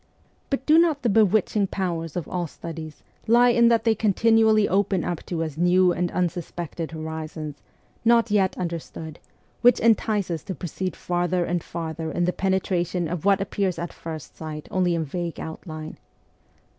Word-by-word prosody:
But 270 -1 -2
do 310 +2 +6
not 320 -4 +2
the 240 - +2
bewitching 210 -1 +3
powers 170 -5 -3
of 175 - -3
all 175 -2 -2
studies 160 -1 -8 0.2
lie 240 +2 +6
in 235 -1 +5
that 230 -1 +3
they 225 -1 +4
continually 220 0 +3
open 195 -1 +1
up 175 -3 -3
to 165 -2 -2
us 155 -2 -5
new 180 +1 +4
and 175 0 -1
unsus 175 -1 -2
pected 170 -1 -5
horizons, 155 -2 -6 0.4
not 230 -1 +4
yet 195 -3 +2
understood, 165 -2 -5 0.4
which 245 0 +6
entice 215 -4 +2
us 165 -2 -2
to 190 - -4
proceed 180 +4 -4
farther 175 0 0
and 175 -1 -1
farther 160 -1 -5
in 175 +2 0
the 180 - 0
penetration 180 -2 0
of 175 +1 -4
what 200 -1 +4
appears 195 -2 -1
at 170 0 -5
first 160 -3 -8
sight 155 -1 -7
only 180 -2 +2
in 165 -1 -1
vague 170 +3 -4
outline 155 -1 -7
180 Hz, 170 wpm, -24 LUFS, 165-205 Hz, 0.4 s, do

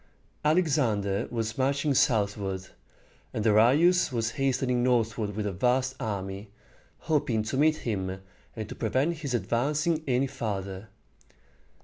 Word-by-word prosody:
Alexander 135 - +1
was 115 0 -3
marching 140 +2 +1
southward, 100 -6 0 0.7
and 110 - -1
Darius 135 +12 +4
was 115 -2 -1
hastening 130 -2 0
northward 115 -4 0
with 105 -1 -2
a 100 - -1
vast 125 +7 +1
army, 100 -3 -4 0.5
hoping 145 -9 0
to 110 - -3
meet 155 +3 +4
him 95 -4 -2 0.4
and 110 -2 -5
to - - -7
prevent 135 +9 0
his 140 -5 -3
advancing 150 +8 0
any 130 +1 +2
farther. 100 -5 -5
120 Hz, 120 wpm, -28 LUFS, 105-140 Hz, 0.7 s, Darius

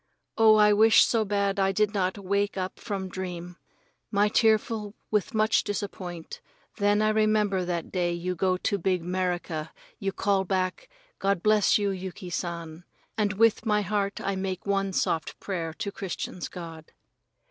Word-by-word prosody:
Oh, 220 -1 +6
I 210 -1 +6
wish 220 +2 +6
so 230 -2 +1
bad 200 -1 0
I 195 0 +3
did 210 +2 +1
not 185 -2 0
wake 200 +1 -1
up 185 0 -4
from 195 -2 -4
dream! 180 -1 -6 0.5
I 205 -1 +3
was 210 - +2
tearful 220 -1 +2 0.2
with 210 0 0
much 215 +1 +3
disappoint, 185 -4 -5 0.4
then 205 +1 +3
I 215 - +3
remember 215 -3 +2
that 175 -2 -3
day 175 -2 0
you 175 +1 -2
go 185 +1 +1
to 200 +2 -1
big 180 -1 0
'Merica 175 -3 -2 0.3
you 195 -1 -1
call 195 0 +1
back 190 - -2 0.3
"God 195 -2 0
bless 215 -1 +4
you, 205 -1 0
Yuki 185 -1 -6
San," 170 -1 -5 0.3
and 210 -2 +1
with 225 +1 +3
my 210 -2 +1
heart 200 -1 -1
I 195 - -2
make 190 -1 -4
one 195 -1 0
soft 165 -3 -1
prayer 170 -5 -3
to 200 - -4
Christians' 185 -2 -5
God. 165 -3 -10
195 Hz, 165 wpm, -27 LUFS, 180-210 Hz, 0.5 s, Oh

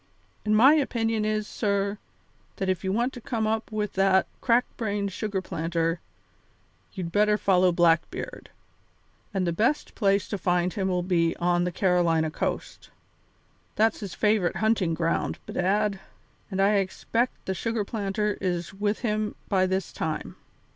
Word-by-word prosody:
And 215 0 +2
my 265 +7 +8
opinion 225 -7 +1
is, 215 0 0
sir, 200 -1 -1 0.6
that 190 - -2
if 185 0 -1
you 190 - 0
want 240 +6 0
to 245 - -9
come 225 -1 -2
up 220 +1 -1
with 210 -1 -2
that 195 0 +3 0.2
crack 240 0 +3
brained 205 -3 -2
sugar 195 -1 -3
planter, 165 -1 -1 0.9
you'd 175 -4 -5
better 210 +2 +3
follow 185 -3 +3
Blackbeard; 170 - 0 0.8
and 190 -3 0
the 170 - 0
best 235 - 0
place 200 -2 +2
to 205 - -3
find 180 0 +1
him 195 -3 -1
will 180 -1 0
be 170 -2 +1
on 175 0 +1
the 180 - -1
Carolina 170 -4 +2
coast; - - -4 0.9
that's 220 +1 +2
his 200 -4 -6
favourite 210 -4 +2
hunting 195 -4 +1
ground, 165 0 -1
bedad, 200 +2 0 0.5
and 195 -2 -3
I 200 +2 +4
expect 225 +5 -1
the 190 - -1
sugar 225 +2 -2
planter 210 0 -2
is 175 -1 -2
with 205 +2 -1
him 215 -3 -1
by 185 -2 +3
this 190 0 -2
time." 155 -1 -3
195 Hz, 155 wpm, -26 LUFS, 180-215 Hz, 0.9 s, my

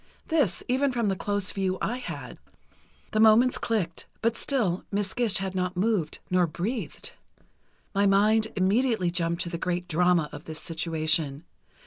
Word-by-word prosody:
This, 290 - +2
even 265 +2 +2
from 235 -4 0
the 195 - 0
close 205 +1 -1
view 190 -1 -1
I 240 - -1
had. 255 - -7 0.7
The 215 - 0
moments 225 +3 +5
clicked 185 -8 -2 0.2
but 230 0 +2
still 215 -12 0
Miss 200 -1 -1
Gish 230 -4 +1
had 190 -1 -3
not 180 -1 -2
moved, 190 -5 0
nor 180 -1 +3
breathed. 195 - -4 0.8
My 200 0 +3
mind 215 +3 +4
immediately 200 0 +2
jumped 170 0 -1
to 170 - -5
the 170 -1 -4
great 180 0 -2
drama 175 -1 +3
of 150 - -9
this 160 -1 -6
situation. 155 -2 -1
190 Hz, 155 wpm, -27 LUFS, 170-220 Hz, 0.8 s, moments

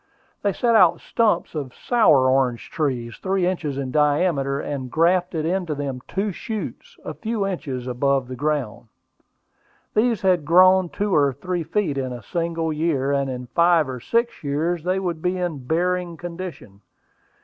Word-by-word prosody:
They 200 - +1
set 235 +4 +1
out 180 -6 +5
stumps 215 -7 0
of 140 -5 -5
sour 150 - +4
orange 130 -2 +1
trees, 130 -9 -2
three 190 -1 0
inches 170 -6 -2
in 135 -2 -3
diameter, 145 -1 +1
and 135 -3 -4
graft 175 +5 +2
into 165 0 -1
them 140 -3 -4
two 200 +2 -1
shoots, 235 - -6
a - - -4
few 220 -3 -2
inches 140 -10 -4
above 130 +1 0
the 130 - -6
ground. 140 -5 -2 1.1
These 225 -1 +1
had 180 -4 +3
grown 185 +3 +5
two 205 +1 -2
or 145 -3 +4
three 180 +6 -3
feet 160 -3 -1
in 130 -1 -3
a 120 -2 -8
single 165 - -2
year, 150 -3 0
and 140 -1 0
in 125 -1 -5
five 170 -3 +4
or 130 -1 -5
six 235 - -1
years 155 +4 -1
they 185 +2 0
would 175 -4 -3
be 180 +2 0
in 160 -8 -4
bearing 175 +1 0
condition. 170 - -8
165 Hz, 160 wpm, -23 LUFS, 140-185 Hz, 1.1 s, out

